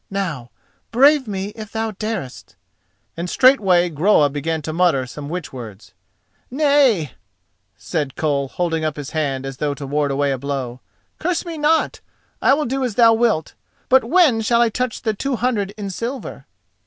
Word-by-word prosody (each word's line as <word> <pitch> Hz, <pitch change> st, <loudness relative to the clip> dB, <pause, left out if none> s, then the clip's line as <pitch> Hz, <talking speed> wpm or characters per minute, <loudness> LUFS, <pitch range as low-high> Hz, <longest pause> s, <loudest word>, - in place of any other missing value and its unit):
Now, 170 Hz, -12 st, -4 dB, 0.4 s
brave 275 Hz, +2 st, +4 dB
me, 195 Hz, -1 st, -3 dB
if 215 Hz, 0 st, -10 dB
thou 225 Hz, 0 st, -2 dB
darest," 210 Hz, -, -6 dB, 0.6 s
and 170 Hz, +2 st, -4 dB
straightway 195 Hz, -10 st, +4 dB
Groa 155 Hz, -2 st, +3 dB
began 155 Hz, +2 st, -3 dB
to 155 Hz, -, -4 dB
mutter 165 Hz, -6 st, +2 dB
some 145 Hz, +3 st, -8 dB
witch 175 Hz, -3 st, -5 dB
words. 115 Hz, -5 st, -10 dB, 0.6 s
"Nay," 270 Hz, -, +3 dB, 0.7 s
said 145 Hz, -4 st, -3 dB
Koll, 140 Hz, -3 st, 0 dB
holding 165 Hz, +2 st, -2 dB
up 155 Hz, -2 st, -1 dB
his 145 Hz, 0 st, -7 dB
hand 140 Hz, -4 st, -2 dB
as 135 Hz, -1 st, -6 dB
though 145 Hz, 0 st, -1 dB
to 140 Hz, -, -7 dB
ward 145 Hz, +1 st, 0 dB
away 140 Hz, +1 st, 0 dB
a 135 Hz, -, -2 dB
blow. 130 Hz, -3 st, -4 dB, 0.4 s
"Curse 355 Hz, +2 st, -1 dB
me 335 Hz, -1 st, -5 dB
not: 310 Hz, +1 st, +1 dB, 0.4 s
I 270 Hz, -, +5 dB
will 300 Hz, +1 st, -1 dB
do 270 Hz, +2 st, -2 dB
as 240 Hz, -5 st, -2 dB
thou 230 Hz, -1 st, +6 dB
wilt. 225 Hz, -9 st, +1 dB, 0.4 s
But 265 Hz, 0 st, +5 dB
when 285 Hz, -3 st, +3 dB
shall 235 Hz, +1 st, +2 dB
I 235 Hz, -, +4 dB
touch 250 Hz, +1 st, -3 dB
the 220 Hz, -2 st, 0 dB
two 270 Hz, +5 st, -2 dB
hundred 225 Hz, -5 st, -1 dB
in 200 Hz, -2 st, -5 dB
silver?" 230 Hz, -, -6 dB
190 Hz, 170 wpm, -20 LUFS, 145-240 Hz, 0.7 s, thou